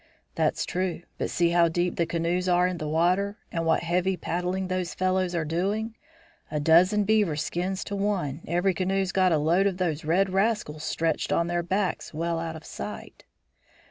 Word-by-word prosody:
"That's - - 0
true. 180 -1 -2 0.2
But - - -1
see 170 -1 +2
how 170 0 +5
deep 175 +2 0
the 170 - 0
canoes 170 +2 0
are 180 0 +4
in 180 -2 -2
the 155 - -3
water, 180 +6 +1
and 165 -1 -2
what 160 - +2
heavy 180 +2 0
paddling 180 +3 -2
those 185 -1 -2
fellows 185 -1 0
are 165 -2 0
doing! 200 +8 -1 0.5
A 150 - -2
dozen 180 +7 +5
beaver 205 -6 +2
skins 180 +5 -2
to 200 - -5
one, 190 -8 -1
every 175 +3 +1
canoe's 190 +1 0
got 185 -2 +3
a 160 - +4
load 170 +6 +3
of 190 -2 -2
those 165 -4 -1
red 185 +5 +2
rascals 195 -6 0
stretched 160 0 -1
on 170 - +2
their 175 0 -1
backs 185 -2 -2
well 165 +1 -1
out 165 -1 -4
of 160 - -10
sight." - - -8
180 Hz, 185 wpm, -26 LUFS, 165-190 Hz, 0.5 s, how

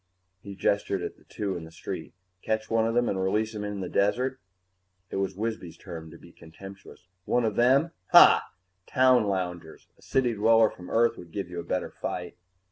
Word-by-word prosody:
He 100 -1 -9
gestured 100 -1 0
at - - -6
the - - -24
two 100 -2 -4
in 85 - -6
the 80 - -10
street. 80 - -7 0.3
"Catch 110 0 -2
one 115 0 +2
of 115 - -2
them 120 0 +2
and 95 - -1
release 105 +4 0
him 105 -1 -5
in 105 -1 -4
the 90 - -3
desert?" 125 +8 0 0.7
It - - -3
was 95 -1 -2
Wisby's 105 -6 -4
turn 85 -3 -9
to - - -13
be 85 - -16
contemptuous. 95 +4 -13 0.2
"One 120 -1 +1
of 110 -2 -1
them? 135 +7 +3 0.2
Hah! - - +8 0.5
Town 130 -3 +4
loungers! 90 -4 -4
A - - -23
city 125 -3 0
dweller 110 +1 +4
from 90 - -12
Earth 115 +1 +2
would 85 -2 -12
give 95 -2 -5
you 85 - -5
a - - -5
better - - -3
fight." 90 -1 -5
100 Hz, 200 wpm, -27 LUFS, 90-115 Hz, 0.7 s, Hah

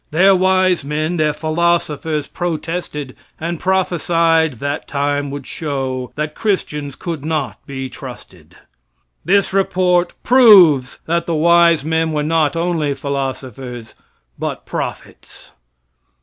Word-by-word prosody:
Their 190 +5 +5
wise 185 -2 +2
men, 155 +4 -2
their 155 -1 +2
philosophers 155 -1 -1
protested, 165 -5 -4 0.2
and 170 +1 -3
prophesied 170 -4 +1
that 140 +4 -4
time 145 0 -1
would 140 -1 -6
show 135 -4 -4
that 150 0 -3
Christians 150 -10 -2
could 165 -3 -5
not 155 -4 -3
be 135 -1 -5
trusted. 120 - -12 0.7
This 200 +1 +2
report 180 -2 +1
proves 190 - +6
that 170 +1 -1
the 170 - 0
wise 170 -1 +4
men 160 0 0
were 150 -1 0
not 160 0 +1
only 165 -4 -1
philosophers, 130 -4 -5 0.5
but - - -4
prophets. - - -7
155 Hz, 115 wpm, -18 LUFS, 140-175 Hz, 0.7 s, proves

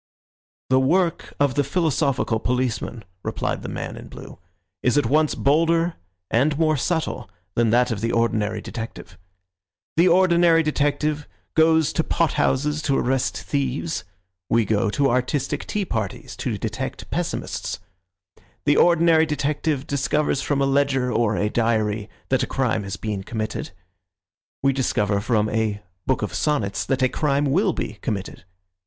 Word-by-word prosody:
"The 130 - +5
work 170 +5 +1
of 140 -2 +3
the 145 +2 +2
philosophical 140 -7 0
policeman," 125 -2 -2 0.2
replied - - -2
the - - -6
man - - -5
in - - -10
blue, - - -11 0.4
"is 125 +3 +2
at 145 - +3
once 155 +5 +2
bolder 165 +4 +2 0.4
and 140 +5 +2
more 155 -1 +3
subtle 145 - -2 0.2
than 115 -1 +2
that 125 +2 +3
of 105 -3 -3
the 115 +1 0
ordinary 110 -2 0
detective. 115 0 -7 0.8
The 170 +2 +6
ordinary 170 -2 +5
detective 150 0 0 0.3
goes 160 -1 +4
to 160 - +1
pot 165 -1 +1
houses 150 +3 +1
to 140 -2 +1
arrest 135 +1 0
thieves; 140 +3 -2 0.5
we 115 -1 +3
go 105 +1 +1
to 140 +6 +2
artistic 135 +3 -1
tea 205 -2 -1
parties 110 - -4
to - - -2
detect - - -5
pessimists. - - -3 0.9
The 145 0 +4
ordinary 165 -2 +5
detective 150 -1 -1
discovers 140 0 0
from 140 -1 0
a - - +3
ledger 135 -2 +1
or 115 -2 +2
a 105 - +1
diary 110 -2 0 0.2
that 130 -1 +2
a - - 0
crime 125 -5 0
has 95 -1 -5
been 105 -3 -3
committed. 110 -1 -4 0.9
We 135 0 +4
discover 105 -6 0
from 110 -1 +1
a 110 -2 -1 0.2
book - - +1
of - - -3
sonnets 105 -10 0
that 135 -1 +1
a - - +6
crime 145 +1 0
will 180 +7 +2
be 105 - -5
committed. 100 -3 -4
135 Hz, 150 wpm, -23 LUFS, 115-155 Hz, 0.9 s, The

